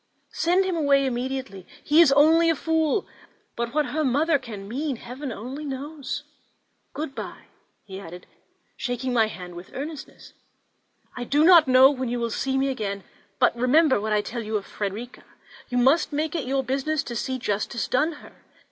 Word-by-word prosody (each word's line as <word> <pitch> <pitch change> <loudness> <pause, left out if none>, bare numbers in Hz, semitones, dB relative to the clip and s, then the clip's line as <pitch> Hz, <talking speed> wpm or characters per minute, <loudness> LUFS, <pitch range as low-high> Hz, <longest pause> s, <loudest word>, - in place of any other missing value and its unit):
Send 360 +3 +2
him 370 -2 -1
away 280 -3 +3
immediately; 255 -6 -4 0.2
he 305 +3 +5
is 315 -5 +6
only 320 +4 +5
a 325 - +3
fool: 320 +4 0 0.5
but 235 0 -3
what 300 -1 +2
her 310 +1 -2
mother 290 +3 +2
can 205 -5 -9
mean, 275 +5 -2
Heaven 250 +4 -7
only 255 +7 -6
knows! 285 +1 -5 0.7
Good 295 -2 -4
bye," - - -8 0.4
he 190 -1 -8
added, 180 -1 -10 0.5
shaking 245 +1 -3
my 225 -2 +4
hand 180 -2 -9
with 175 +1 -10
earnestness; 295 +2 -8 0.8
"I 250 - -4
do 290 +5 +2
not 335 -3 +7
know 260 +1 +7
when 260 -3 -3
you 240 0 -2
will 235 -1 -2
see 265 +3 -1
me 270 +1 +1
again; 200 -6 -3 0.3
but - - +3
remember 260 +1 +3
what 215 +1 -3
I 210 0 +3
tell 235 +3 -5
you 215 -1 -2
of 200 - -7
Frederica; 210 +4 -6 0.5
you 245 - -1
must 270 +7 +3
make 300 +1 -1
it 320 -7 -3
your 270 0 0
business 275 +3 -1
to 235 - -6
see 260 +3 -2
justice 220 0 -2
done 305 +6 +1
her. - - -17
265 Hz, 180 wpm, -25 LUFS, 235-300 Hz, 0.8 s, not